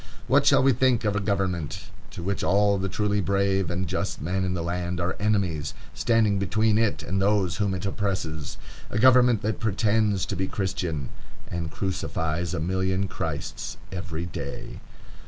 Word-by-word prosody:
What -, -, +3 dB
shall -, -, +6 dB
we 135 Hz, 0 st, +5 dB
think 125 Hz, -1 st, +2 dB
of 105 Hz, -1 st, +1 dB
a -, -, +2 dB
government 95 Hz, -4 st, -2 dB, 0.2 s
to 85 Hz, -, -8 dB
which 100 Hz, +2 st, -1 dB
all 100 Hz, 0 st, +3 dB
the 95 Hz, +1 st, -1 dB
truly 105 Hz, +1 st, 0 dB
brave 95 Hz, +1 st, +1 dB
and 90 Hz, +1 st, -1 dB
just 95 Hz, +3 st, -2 dB
men 90 Hz, +6 st, -1 dB
in 90 Hz, 0 st, -1 dB
the 85 Hz, -, -2 dB
land 90 Hz, +1 st, -2 dB
are 85 Hz, +1 st, -1 dB
enemies, 100 Hz, -8 st, 0 dB, 0.2 s
standing 105 Hz, +5 st, +2 dB
between 110 Hz, +3 st, +2 dB
it 115 Hz, -2 st, +1 dB
and 95 Hz, +2 st, -1 dB
those 95 Hz, -3 st, +2 dB
whom 100 Hz, -2 st, 0 dB
it 95 Hz, -, -4 dB
oppresses? 95 Hz, -7 st, -2 dB, 0.3 s
A -, -, -2 dB
government 125 Hz, -2 st, +5 dB
that 110 Hz, +1 st, -1 dB
pretends 105 Hz, -2 st, +1 dB
to 100 Hz, -, -3 dB
be 95 Hz, +1 st, -1 dB
Christian 90 Hz, -8 st, -2 dB, 0.4 s
and 85 Hz, -2 st, -3 dB
crucifies 85 Hz, -1 st, -2 dB
a -, -, -1 dB
million 95 Hz, +3 st, 0 dB
Christs -, -, -4 dB
every 90 Hz, -3 st, -4 dB
day! 90 Hz, -, -6 dB
95 Hz, 170 wpm, -26 LUFS, 90-105 Hz, 0.4 s, shall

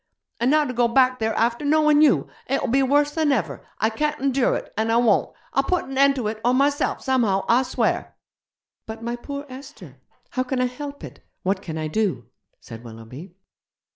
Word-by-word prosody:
And 240 Hz, -, +2 dB
now 305 Hz, +1 st, +4 dB
to 255 Hz, -, -4 dB
go 240 Hz, 0 st, +2 dB
back 255 Hz, +1 st, +3 dB
there 220 Hz, 0 st, -1 dB
after 235 Hz, +4 st, 0 dB
knowin' 300 Hz, 0 st, +4 dB
you! 300 Hz, -4 st, +4 dB, 0.2 s
It'll 275 Hz, +2 st, 0 dB
be 270 Hz, +3 st, +3 dB
worse 290 Hz, +2 st, +2 dB
than 310 Hz, -1 st, +1 dB
ever. 230 Hz, -10 st, -2 dB
I 220 Hz, -, +1 dB
can't 300 Hz, +6 st, -1 dB
endure 270 Hz, -1 st, +1 dB
it, -, -, -6 dB
and 220 Hz, +1 st, 0 dB
I 230 Hz, -, +3 dB
won't! 235 Hz, -4 st, +3 dB, 0.2 s
I'll 275 Hz, -, +3 dB
put 360 Hz, +6 st, -1 dB
an 270 Hz, -, -7 dB
end 275 Hz, +1 st, +4 dB
to 245 Hz, -5 st, -2 dB
it 215 Hz, 0 st, -4 dB
or 245 Hz, +2 st, +3 dB
myself 280 Hz, +2 st, +1 dB
somehow, 230 Hz, -8 st, +1 dB
I 240 Hz, +2 st, +4 dB
swear!' 260 Hz, -, -1 dB, 0.7 s
'But 220 Hz, +1 st, -7 dB
my 235 Hz, +1 st, -2 dB
poor 280 Hz, +4 st, -7 dB
Esther, 270 Hz, +2 st, -12 dB, 0.3 s
how 255 Hz, -, -1 dB
can 255 Hz, 0 st, -2 dB
I 250 Hz, -, +2 dB
help 280 Hz, +3 st, -7 dB
it? -, -, -11 dB, 0.2 s
what 190 Hz, +1 st, 0 dB
can 160 Hz, -4 st, -6 dB
I 155 Hz, 0 st, -2 dB
do?' 180 Hz, -, -1 dB, 0.3 s
said 115 Hz, -2 st, -11 dB
Willoughby. 120 Hz, +10 st, -11 dB
255 Hz, 200 wpm, -23 LUFS, 220-280 Hz, 0.7 s, now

